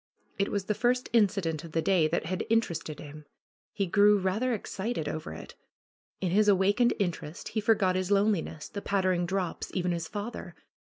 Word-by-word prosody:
It 200 Hz, -, +1 dB
was 200 Hz, -2 st, -2 dB
the 210 Hz, -, 0 dB
first 250 Hz, +3 st, 0 dB
incident 195 Hz, -8 st, +2 dB
of 165 Hz, -2 st, -10 dB
the 165 Hz, -, +1 dB
day 180 Hz, -5 st, +3 dB
that 155 Hz, -, -1 dB
had 185 Hz, +3 st, -2 dB
interested 175 Hz, -9 st, 0 dB
him. 150 Hz, 0 st, -10 dB, 0.5 s
He 200 Hz, -, -1 dB
grew 205 Hz, +3 st, +5 dB
rather 200 Hz, +7 st, 0 dB
excited 215 Hz, -3 st, -3 dB
over 155 Hz, 0 st, -4 dB
it. -, -, -9 dB, 0.7 s
In 185 Hz, -3 st, 0 dB
his 210 Hz, +3 st, +4 dB
awakened 205 Hz, +5 st, +3 dB
interest 175 Hz, -5 st, -3 dB
he 215 Hz, -, -2 dB
forgot 200 Hz, -4 st, +3 dB
his 185 Hz, 0 st, -1 dB
loneli 200 Hz, -3 st, +3 dB
ness, 155 Hz, -2 st, -8 dB
the 200 Hz, -, -6 dB
pattering 185 Hz, -3 st, +1 dB
drops, 185 Hz, -2 st, -2 dB
even 180 Hz, -1 st, 0 dB
his 170 Hz, -2 st, -3 dB
father. 210 Hz, +6 st, -6 dB
195 Hz, 180 wpm, -29 LUFS, 175-210 Hz, 0.7 s, grew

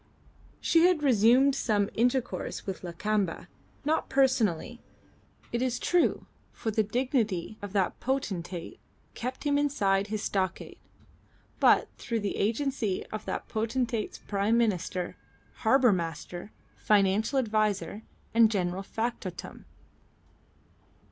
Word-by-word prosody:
She 335 Hz, +1 st, +4 dB
had 350 Hz, -5 st, +1 dB
resumed 255 Hz, +2 st, +5 dB
some 210 Hz, -6 st, +1 dB
intercourse 245 Hz, +2 st, -1 dB
with 195 Hz, -2 st, -5 dB
Lakamba, 185 Hz, +1 st, -2 dB, 0.4 s
not 315 Hz, +2 st, 0 dB
personally, 245 Hz, -5 st, +1 dB, 0.7 s
it 235 Hz, -, -1 dB
is 250 Hz, -1 st, 0 dB
true 355 Hz, -1 st, +1 dB, 0.3 s
(for 220 Hz, -, -3 dB
the 220 Hz, -, +2 dB
dignity 220 Hz, -, -1 dB
of 205 Hz, -1 st, -6 dB
that 195 Hz, -3 st, 0 dB
potentate 195 Hz, -, -3 dB, 0.3 s
kept 255 Hz, +2 st, -5 dB
him 285 Hz, -1 st, +2 dB
inside 200 Hz, -9 st, +1 dB
his 215 Hz, 0 st, -3 dB
stockade), 190 Hz, -2 st, -2 dB, 0.8 s
but -, -, +5 dB
through 230 Hz, -2 st, -2 dB
the 200 Hz, -, -2 dB
agency 225 Hz, -2 st, -1 dB
of 215 Hz, 0 st, -5 dB
that -, -, -4 dB
potentate's 230 Hz, 0 st, -2 dB
prime 205 Hz, +3 st, 0 dB
minister, 185 Hz, -5 st, -1 dB, 0.4 s
harbour 245 Hz, +1 st, +4 dB
master, 175 Hz, +3 st, -5 dB, 0.3 s
financial 210 Hz, +5 st, +2 dB
adviser, 215 Hz, -5 st, 0 dB, 0.3 s
and 230 Hz, -1 st, +6 dB
general 185 Hz, -3 st, -1 dB
factotum. 210 Hz, -4 st, -5 dB
220 Hz, 110 wpm, -29 LUFS, 195-255 Hz, 0.8 s, and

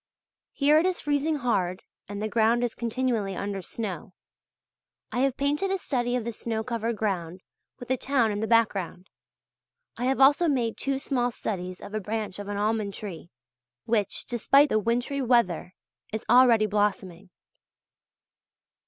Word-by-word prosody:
Here 295 Hz, +2 st, +4 dB
it 345 Hz, -, +2 dB
is 370 Hz, -, -1 dB
freezing 295 Hz, +2 st, 0 dB
hard 195 Hz, -9 st, -1 dB, 0.3 s
and 205 Hz, 0 st, -5 dB
the 215 Hz, -, -1 dB
ground 230 Hz, +2 st, +2 dB
is 240 Hz, -, -1 dB
continually 230 Hz, -4 st, -1 dB
under 200 Hz, 0 st, -3 dB
snow. 190 Hz, 0 st, -6 dB, 1.0 s
I 245 Hz, -, -2 dB
have 270 Hz, -1 st, +1 dB
painted 295 Hz, +7 st, 0 dB
a 390 Hz, -, 0 dB
study 245 Hz, -8 st, -1 dB
of 245 Hz, -, -1 dB
the 235 Hz, -, -3 dB
snow 220 Hz, 0 st, -3 dB
covered 230 Hz, -1 st, -2 dB
ground 185 Hz, -4 st, -2 dB, 0.4 s
with 245 Hz, -, -10 dB
the 260 Hz, -, +1 dB
town 250 Hz, -4 st, +1 dB
in 205 Hz, -, -3 dB
the 220 Hz, -, -1 dB
background. 200 Hz, -5 st, 0 dB, 0.9 s
I 245 Hz, -, -2 dB
have 265 Hz, +1 st, +1 dB
also 285 Hz, +6 st, +5 dB
made 245 Hz, -6 st, 0 dB
two 275 Hz, 0 st, -1 dB
small 260 Hz, -3 st, 0 dB
studies 185 Hz, -6 st, -5 dB
of 205 Hz, -, -10 dB
a 215 Hz, -, -1 dB
branch 210 Hz, -1 st, -4 dB
of 205 Hz, -, -6 dB
an 205 Hz, 0 st, -3 dB
almond 210 Hz, -1 st, -1 dB
tree, 180 Hz, -5 st, -8 dB, 0.6 s
which, 225 Hz, -3 st, 0 dB
despite 275 Hz, +5 st, +3 dB
the 215 Hz, -, +2 dB
wintry 245 Hz, +6 st, -1 dB
weather, 230 Hz, -8 st, +1 dB, 0.4 s
is 220 Hz, -1 st, -4 dB
already 240 Hz, -4 st, +6 dB
blossoming. 200 Hz, -3 st, -1 dB
230 Hz, 160 wpm, -26 LUFS, 205-255 Hz, 1.0 s, already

